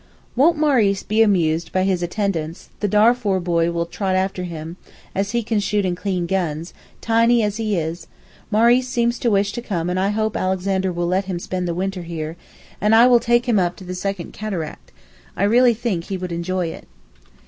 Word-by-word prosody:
Won't 310 Hz, +6 st, +4 dB
Maurice 240 Hz, -10 st, +2 dB
be 215 Hz, +1 st, +1 dB
amused 170 Hz, -6 st, +2 dB
by 185 Hz, -, +1 dB
his 190 Hz, -2 st, 0 dB
attendants, 175 Hz, -3 st, -3 dB
the 205 Hz, -, 0 dB
Darfoor 210 Hz, -1 st, +3 dB
boy 170 Hz, -1 st, +1 dB
will 170 Hz, 0 st, -1 dB
trot 190 Hz, +2 st, -2 dB
after 185 Hz, -1 st, -1 dB
him, 165 Hz, 0 st, -7 dB, 0.4 s
as 195 Hz, +1 st, -1 dB
he 235 Hz, +2 st, -1 dB
can 220 Hz, -1 st, 0 dB
shoot 205 Hz, 0 st, 0 dB
and 180 Hz, -1 st, 0 dB
clean 180 Hz, -1 st, -2 dB
guns, 170 Hz, -3 st, -2 dB, 0.3 s
tiny 230 Hz, +1 st, +3 dB
as 210 Hz, 0 st, -1 dB
he 215 Hz, -3 st, -1 dB
is 160 Hz, +1 st, -4 dB, 0.4 s
Maurice 235 Hz, +4 st, +4 dB
seems 235 Hz, -1 st, 0 dB
to 240 Hz, -, +1 dB
wish 200 Hz, -1 st, +2 dB
to 240 Hz, -, -5 dB
come 180 Hz, -7 st, -2 dB
and 185 Hz, -, -1 dB
I 195 Hz, +1 st, +1 dB
hope 215 Hz, 0 st, -1 dB
Alexander 190 Hz, 0 st, 0 dB
will 175 Hz, 0 st, -2 dB
let 185 Hz, +3 st, 0 dB
him 185 Hz, -2 st, -3 dB
spend 180 Hz, +1 st, -3 dB
the 170 Hz, -, -2 dB
winter 190 Hz, +1 st, -2 dB
here, 165 Hz, -2 st, -5 dB, 0.5 s
and 210 Hz, +2 st, +4 dB
I 230 Hz, +2 st, +7 dB
will 245 Hz, -1 st, +6 dB
take 240 Hz, +1 st, +2 dB
him 225 Hz, -4 st, +3 dB
up 175 Hz, -1 st, 0 dB
to 190 Hz, -, -12 dB
the 180 Hz, 0 st, -6 dB
second 185 Hz, -1 st, -4 dB
Cataract; 185 Hz, -8 st, -6 dB, 0.5 s
I -, -, 0 dB
really 235 Hz, +3 st, +4 dB
think 210 Hz, -7 st, -2 dB
he 195 Hz, -, -4 dB
would 180 Hz, -1 st, -5 dB
enjoy 170 Hz, +1 st, -2 dB
it. -, -, -10 dB
195 Hz, 205 wpm, -21 LUFS, 175-220 Hz, 0.5 s, I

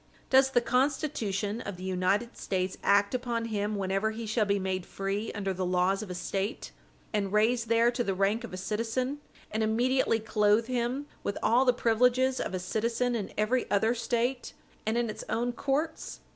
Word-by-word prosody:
Does 265 Hz, 0 st, +6 dB
the 245 Hz, -2 st, +3 dB
Constitution 235 Hz, -6 st, 0 dB
of 200 Hz, -2 st, -6 dB
the 185 Hz, -, -9 dB
United 190 Hz, +5 st, 0 dB
States 185 Hz, 0 st, -2 dB
act 200 Hz, +2 st, +3 dB
upon 240 Hz, -2 st, -1 dB
him 210 Hz, -1 st, -2 dB
whenever 195 Hz, +2 st, 0 dB
he 225 Hz, +1 st, -5 dB
shall 215 Hz, 0 st, +1 dB
be 200 Hz, 0 st, +1 dB
made 190 Hz, -1 st, -2 dB
free 195 Hz, +4 st, -3 dB
under 195 Hz, -2 st, -2 dB
the 185 Hz, 0 st, -3 dB
laws 180 Hz, +2 st, +1 dB
of 215 Hz, -, -7 dB
a 180 Hz, -, -4 dB
State, 195 Hz, +4 st, -3 dB, 0.4 s
and 200 Hz, -2 st, 0 dB
raised 225 Hz, +2 st, +2 dB
there 230 Hz, +1 st, +4 dB
to 240 Hz, 0 st, -1 dB
the 195 Hz, -4 st, -1 dB
rank 200 Hz, +5 st, +1 dB
of 235 Hz, -, -7 dB
a 185 Hz, -, -6 dB
citizen, 230 Hz, +8 st, -2 dB, 0.3 s
and 220 Hz, -, -1 dB
immediately 230 Hz, +2 st, +2 dB
clothe 215 Hz, 0 st, +2 dB
him 250 Hz, +3 st, -1 dB, 0.2 s
with 200 Hz, -, -3 dB
all 245 Hz, +4 st, +4 dB
the 250 Hz, -, +6 dB
privileges 250 Hz, +2 st, +2 dB
of -, -, -3 dB
a -, -, -2 dB
citizen 230 Hz, +6 st, -1 dB
in 215 Hz, -5 st, -3 dB
every 225 Hz, +4 st, +1 dB
other 220 Hz, +3 st, +3 dB
State, 240 Hz, +2 st, -1 dB, 0.3 s
and 220 Hz, +2 st, +1 dB
in 240 Hz, -1 st, +1 dB
its 215 Hz, -, -6 dB
own 240 Hz, +1 st, 0 dB
courts? 290 Hz, +5 st, -2 dB
220 Hz, 185 wpm, -29 LUFS, 200-245 Hz, 0.4 s, Does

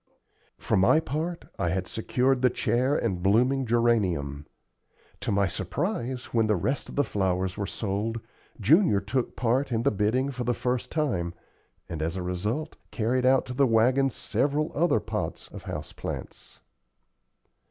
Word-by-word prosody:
For -, -, 0 dB
my 95 Hz, +12 st, +5 dB
part, 160 Hz, +3 st, -3 dB
I 90 Hz, -3 st, +1 dB
had 95 Hz, +2 st, -1 dB
secured 125 Hz, +5 st, 0 dB
the 130 Hz, -, +5 dB
chair 130 Hz, +4 st, +1 dB
and 95 Hz, -10 st, -1 dB
blooming 125 Hz, +7 st, +3 dB
geranium. 95 Hz, -12 st, +1 dB, 0.7 s
To -, -, -2 dB
my 100 Hz, 0 st, +3 dB
surprise, 125 Hz, -, -2 dB
when 115 Hz, -2 st, +3 dB
the 105 Hz, -, +3 dB
rest 105 Hz, +11 st, -2 dB
of -, -, -8 dB
the 145 Hz, -, +3 dB
flowers 95 Hz, -4 st, -1 dB
were 100 Hz, -, -3 dB
sold, 110 Hz, +2 st, -2 dB, 0.4 s
Junior 160 Hz, -, +4 dB
took 120 Hz, +6 st, -2 dB
part 130 Hz, +3 st, +1 dB
in 115 Hz, -1 st, 0 dB
the -, -, +3 dB
bidding 110 Hz, +7 st, +1 dB
for 125 Hz, -2 st, -4 dB
the 120 Hz, 0 st, 0 dB
first 125 Hz, -1 st, -2 dB
time, 90 Hz, -, -1 dB, 0.5 s
and, 80 Hz, -2 st, -5 dB
as 80 Hz, +3 st, -1 dB
a 95 Hz, -, -3 dB
result, 105 Hz, -, -3 dB
carried 125 Hz, +3 st, +1 dB
out 130 Hz, 0 st, +4 dB
to 130 Hz, -, -6 dB
the 135 Hz, +1 st, +3 dB
wagon 125 Hz, +4 st, +3 dB
several 145 Hz, +4 st, -1 dB
other 175 Hz, +4 st, +2 dB
pots -, -, -4 dB
of -, -, -10 dB
house -, -, -6 dB
plants. -, -, -7 dB
120 Hz, 160 wpm, -27 LUFS, 95-135 Hz, 0.7 s, my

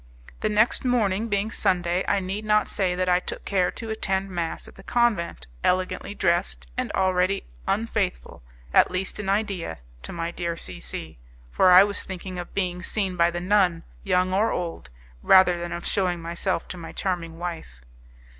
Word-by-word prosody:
The 215 Hz, -, 0 dB
next 215 Hz, +2 st, +3 dB
morning, 225 Hz, -4 st, +1 dB
being 210 Hz, +1 st, 0 dB
Sunday, 180 Hz, -2 st, +1 dB
I 200 Hz, -, +2 dB
need 195 Hz, +3 st, -4 dB
not 210 Hz, 0 st, +3 dB
say 185 Hz, -3 st, 0 dB
that 185 Hz, 0 st, 0 dB
I 180 Hz, 0 st, +4 dB
took -, -, -7 dB
care 185 Hz, -3 st, +2 dB
to 225 Hz, -1 st, -6 dB
attend 195 Hz, -3 st, -1 dB
mass 170 Hz, -2 st, -3 dB
at -, -, -13 dB
the -, -, -14 dB
convent, 215 Hz, -, 0 dB, 0.2 s
elegantly 185 Hz, +2 st, 0 dB
dressed, 115 Hz, -, 0 dB
and -, -, -2 dB
already 185 Hz, +1 st, +2 dB, 0.2 s
unfaithful 200 Hz, -, -1 dB, 0.3 s
at -, -, +6 dB
least 185 Hz, +2 st, -3 dB
in 200 Hz, -2 st, -3 dB
idea 195 Hz, -, -1 dB, 0.2 s
to -, -, -8 dB
my 170 Hz, 0 st, -3 dB
dear 170 Hz, -1 st, -3 dB
C 90 Hz, -, -8 dB
C, 80 Hz, -4 st, -7 dB, 0.3 s
for 185 Hz, -, +4 dB
I 180 Hz, +1 st, +10 dB
was 205 Hz, 0 st, -1 dB
thinking 185 Hz, -1 st, -6 dB
of 175 Hz, -, -8 dB
being 180 Hz, -2 st, -1 dB
seen 190 Hz, -1 st, -1 dB
by 170 Hz, -1 st, +4 dB
the 175 Hz, 0 st, -3 dB
nun, 180 Hz, -3 st, +2 dB, 0.2 s
young 185 Hz, -1 st, +2 dB
or 210 Hz, +4 st, +2 dB
old, 165 Hz, -, -4 dB, 0.3 s
rather 180 Hz, -, +6 dB
than 175 Hz, 0 st, -4 dB
of 175 Hz, -, -5 dB
shewing 180 Hz, -3 st, 0 dB
myself 170 Hz, +2 st, -2 dB
to 180 Hz, -, -6 dB
my 165 Hz, -1 st, -8 dB
charming 170 Hz, -3 st, -3 dB
wife. 165 Hz, -, -6 dB
185 Hz, 180 wpm, -25 LUFS, 175-200 Hz, 0.3 s, I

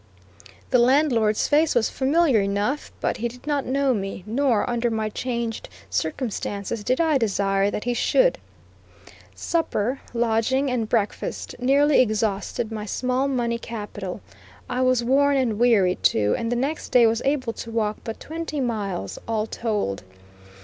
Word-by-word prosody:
The 250 Hz, -, +5 dB
landlord's 240 Hz, -4 st, +3 dB
face 305 Hz, +2 st, +3 dB
was 235 Hz, -2 st, +3 dB
familiar 275 Hz, -3 st, +3 dB
enough, 205 Hz, +9 st, -1 dB
but -, -, 0 dB
he 235 Hz, -, -1 dB
did 245 Hz, +3 st, -12 dB
not 290 Hz, -2 st, -1 dB
know 270 Hz, 0 st, +2 dB
me, 195 Hz, -3 st, -4 dB
nor, 235 Hz, 0 st, +1 dB
under 240 Hz, 0 st, 0 dB
my 220 Hz, -1 st, -1 dB
changed 235 Hz, 0 st, -4 dB, 0.2 s
circumstances, 205 Hz, -, -3 dB
did 255 Hz, +4 st, 0 dB
I 315 Hz, -4 st, +3 dB
desire 195 Hz, -2 st, +1 dB
that 210 Hz, -, -4 dB
he 245 Hz, -, 0 dB
should. -, -, +2 dB, 1.0 s
Supper, 270 Hz, -7 st, -1 dB
lodging, 240 Hz, +3 st, +1 dB
and 230 Hz, -3 st, -1 dB
breakfast 220 Hz, -3 st, -2 dB
nearly 280 Hz, +3 st, +4 dB
exhausted 215 Hz, -1 st, -1 dB
my 215 Hz, -1 st, -5 dB
small 255 Hz, +4 st, 0 dB
money 240 Hz, -3 st, -1 dB
capital; 205 Hz, -5 st, -6 dB, 0.5 s
I 250 Hz, 0 st, -2 dB
was 255 Hz, -2 st, +3 dB
worn 280 Hz, +3 st, +3 dB
and 230 Hz, -5 st, 0 dB
weary, 210 Hz, -7 st, +4 dB
too, 105 Hz, -1 st, +3 dB
and 230 Hz, 0 st, -2 dB
the -, -, +1 dB
next 275 Hz, +6 st, -2 dB
day 245 Hz, -2 st, +6 dB
was 225 Hz, 0 st, +2 dB
able 270 Hz, -4 st, 0 dB
to 230 Hz, -, -8 dB
walk 215 Hz, -2 st, -1 dB
but 225 Hz, -, -6 dB
twenty 320 Hz, -1 st, -5 dB
miles, 205 Hz, -, -3 dB
all 220 Hz, -1 st, 0 dB
told. 210 Hz, -, -2 dB
235 Hz, 150 wpm, -24 LUFS, 215-265 Hz, 1.0 s, day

